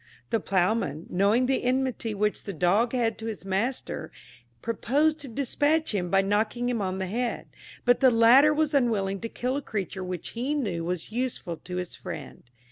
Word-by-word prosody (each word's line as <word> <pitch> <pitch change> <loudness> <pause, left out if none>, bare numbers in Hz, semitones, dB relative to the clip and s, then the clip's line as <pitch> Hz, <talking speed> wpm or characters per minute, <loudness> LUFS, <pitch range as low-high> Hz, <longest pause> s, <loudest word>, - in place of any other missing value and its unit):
The 225 - +2
ploughman, 185 -5 0
knowing 205 +7 +3
the 265 +1 +1
enmity 250 -3 0
which 210 +1 -1
the 200 - -4
dog 195 +8 +2
had 230 -3 0
to 225 - -5
his 215 -4 -6
master, 195 -4 -2 0.5
proposed 290 +7 +1
to 285 - -8
despatch 290 +4 +1
him 180 -3 -1
by 195 +1 +3
knocking 215 +5 0
him 235 -3 -1
on 190 -1 -2
the 190 - -2
head; 235 +6 -2 0.4
but 245 0 +4
the 265 - +6
latter 245 +5 +6
was 300 0 +1
unwilling 210 -8 +1
to 230 - -5
kill 255 +4 -2
a - - -2
creature 195 -6 -4
which 180 -2 -5
he 255 +6 -2
knew 195 - -2
was 175 +3 -3
useful 230 -8 -3
to 180 +2 -8
his 180 -1 -4
friend. 150 - -8
225 Hz, 185 wpm, -27 LUFS, 190-255 Hz, 0.5 s, the